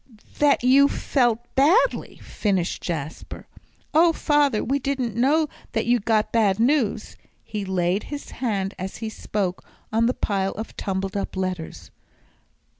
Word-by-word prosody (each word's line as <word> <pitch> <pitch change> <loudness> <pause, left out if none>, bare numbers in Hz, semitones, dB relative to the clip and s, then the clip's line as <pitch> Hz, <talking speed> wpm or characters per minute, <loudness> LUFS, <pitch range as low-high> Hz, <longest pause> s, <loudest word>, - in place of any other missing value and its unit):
" - - -24
that 290 -4 +4
you 270 +3 +6
felt 245 -5 +1 0.2
badly," 340 - +3
finished 190 -4 -1
Jasper. 155 -3 -5 0.5
"Oh, 330 +2 +6
father, 290 -7 +2
we 275 +3 0
didn't 265 -4 -2
know 295 +6 +3 0.3
that 225 - 0
you'd 240 -3 +1
got 220 -1 +2
bad 215 -3 +2
news." 235 -4 +1 0.3
He 210 -2 -5
laid 185 +1 0
his 290 -1 -7
hand 205 -6 -2
as 190 +1 -5
he 225 -1 -4
spoke 195 -4 -3 0.3
on 230 +1 +3
the 250 - 0
pile 195 -2 -1
of 220 +2 -7
tumbled 195 -1 -3
up 200 -1 -3
letters. 185 -3 -4
225 Hz, 145 wpm, -24 LUFS, 195-275 Hz, 0.5 s, you